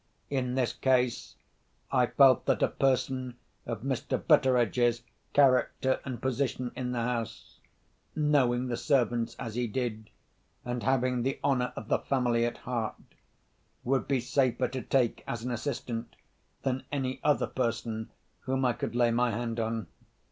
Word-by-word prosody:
In 125 -2 -1
this 125 -4 +1
case, 125 -2 +1 0.6
I 125 -2 +3
felt 135 0 +5
that - - +2
a - - +5
person 130 -2 0 0.3
of 115 -2 -4
Mr. 135 -2 -1
Betteredge's 125 -5 +3 0.3
character 130 -1 +3
and 130 -3 -5
position 130 -1 -1
in 125 -1 -3
the 120 -2 -1
house—knowing 125 +3 -2
the 120 -2 -2
servants 120 -4 +1
as 115 - -5
he 120 +1 -1
did, 110 -2 -3 0.6
and 120 0 -3
having 125 -1 +1
the 135 +3 -1
honour 125 -3 +1
of 110 - -7
the - - +2
family 120 -3 +1
at 120 - -5
heart—would 125 +2 -5
be 135 -2 +2
safer 130 0 +1
to 130 0 -4
take 125 -3 +1
as 115 -1 -4
an 125 - -3
assistant 120 -2 -4 0.5
than 130 0 -1
any 130 -2 -2
other 150 - +3
person 115 -3 -2 0.3
whom 130 0 -1
I 125 - +3
could 115 - -4
lay 120 -1 +3
my 120 +1 +2
hand 115 +1 -2
on. 115 -2 -2
125 Hz, 145 wpm, -29 LUFS, 120-130 Hz, 0.6 s, felt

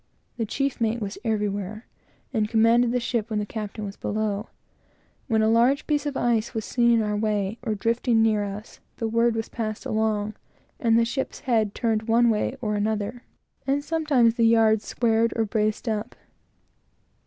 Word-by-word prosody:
The 225 -2 -2
chief 275 +2 -2
mate 225 +1 +1
was 205 -2 -5
everywhere, 210 -1 -2 0.5
and 215 -3 0
commanded 230 +2 +4
the 250 - +1
ship 235 -2 -2
when 215 - -1
the 210 - -1
captain 215 0 -5
was 200 0 -7
below. 215 0 -2 0.8
When 220 -3 +2
a - - +3
large 240 +6 +3
piece 295 -1 0
of 280 - -3
ice 235 -1 0
was 220 - -2
seen 240 -1 +2
in 230 -2 +4
our 210 0 -1
way, 210 0 -1
or 225 -3 -2
drifting 230 +2 +1
near 215 -2 +2
us, 205 +2 -7 0.2
the 225 - -2
word 230 +1 +2
was 225 -1 -2
passed 215 -3 -4
along, 215 -1 0 0.5
and 230 -2 +3
the 230 - +4
ship's 265 +3 -4
head 220 -5 +1
turned 220 -2 0
one 235 +1 +4
way 220 +4 -1
and 210 -1 0
another; 215 +3 -2 0.5
and 280 +1 +1
sometimes 295 -8 +2
the 230 -1 +3
yards 220 -2 +4
squared 230 -1 +1
or 225 - +1
braced 215 +2 -1
up. 220 +1 -2
225 Hz, 175 wpm, -25 LUFS, 215-235 Hz, 0.8 s, commanded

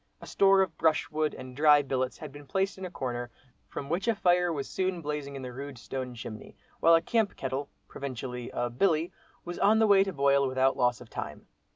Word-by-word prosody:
A - - -11
store 195 0 +4
of 170 -4 -5
brushwood 155 -1 +1
and 130 -1 -9
dry 145 0 +6
billets 130 -2 -2
had 155 -2 -8
been 145 0 -12
placed 190 +5 -1
in 190 - -5
a - - -5
corner, 120 -7 -4 0.4
from 140 - -6
which 175 +7 -2
a 230 - +3
fire 180 -2 +3
was 140 -4 -3
soon 185 -1 -1
blazing 150 -2 -4
in 135 - -6
the 125 -1 -6
rude 140 +1 -7
stone 125 0 -5
chimney, 110 -1 -9 0.2
while 165 0 +6
a 165 - +2
camp 225 +1 +1
kettle 135 +2 -3 0.2
(provincially 125 -2 -6
a 120 0 -2
"billy") 160 +5 +1 0.3
was 175 0 -6
on 215 +2 +5
the 220 - +4
way 200 -2 +6
to 195 - -3
boil 140 -3 +3
without 130 +1 +2
loss 125 -1 +1
of 115 - -13
time. - - -6
145 Hz, 215 wpm, -29 LUFS, 130-175 Hz, 0.4 s, dry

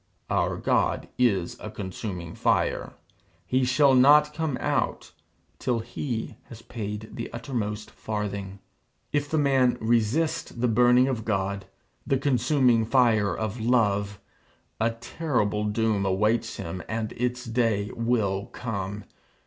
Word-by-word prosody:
Our - - +1
God - - 0
is 100 -9 +1
a 110 - -6
consuming 95 -4 -6
fire. - - 0 0.5
He 130 +1 +1
shall 135 +2 +4
not 150 +4 +6
come 155 -4 -2
out - - -1 0.5
till 125 -2 0
he 120 +1 -4
has 115 -1 -12
paid 105 -1 -6
the 115 - -6
uttermost 110 -3 -4
farthing. 100 -2 -4 0.6
If 145 0 0
the 160 - 0
man 135 -4 +3
resists 115 +8 +1
the 125 +1 0
burning 125 +2 +5
of 125 -5 -2
God, 100 -2 -1 0.4
the 135 - +2
consuming 130 -3 +3
fire 110 -4 +3
of 110 +1 -3
Love, 105 -4 +1 0.6
a 115 +1 +3
terrible 115 -3 -1
doom 105 -1 +1
awaits 105 +4 +1
him, 85 +2 -5
and 110 0 -2
its 125 +1 -2
day 115 -3 0
will 110 -5 0
come. 105 -4 -5
115 Hz, 125 wpm, -26 LUFS, 105-125 Hz, 0.6 s, not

